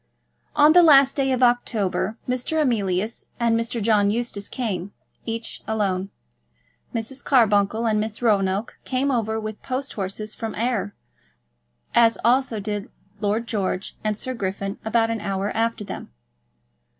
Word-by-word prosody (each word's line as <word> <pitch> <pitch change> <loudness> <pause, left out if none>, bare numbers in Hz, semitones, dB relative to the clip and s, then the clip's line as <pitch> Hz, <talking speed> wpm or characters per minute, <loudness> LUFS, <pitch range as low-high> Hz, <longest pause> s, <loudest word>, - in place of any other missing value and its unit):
On 300 +1 +7
the 355 - +8
last 275 -5 +7
day 270 -2 +1
of 255 0 +1
October, 225 -3 +1
Mr. 255 +5 -1
Emilius 215 -6 0
and 235 -1 +2
Mr. 230 +1 -1
John 210 -2 +3
Eustace 215 -2 -2
came, 200 -6 -3 0.3
each 225 0 -3
alone. 195 -3 -1 0.8
Mrs. 245 +4 -4
Carbuncle 220 -3 +3
and 215 -2 +2
Miss 215 0 -3
Roanoke 200 -2 +1
came 270 +2 0
over 220 -3 0
with 215 -1 -6
post 265 +2 -3
horses 210 +2 -4
from 225 -1 -5
Ayr, 225 -3 -1 1.0
as 230 -1 +5
also 245 -2 +3
did 205 0 -4 0.3
Lord 215 +3 0
George 195 -4 -2
and 215 -1 -1
Sir 255 +3 -3
Griffin 195 -2 -3
about 225 +1 +2
an 225 -2 -3
hour 195 +1 -2
after 230 -1 0
them. - - -7
225 Hz, 140 wpm, -23 LUFS, 205-245 Hz, 1.0 s, the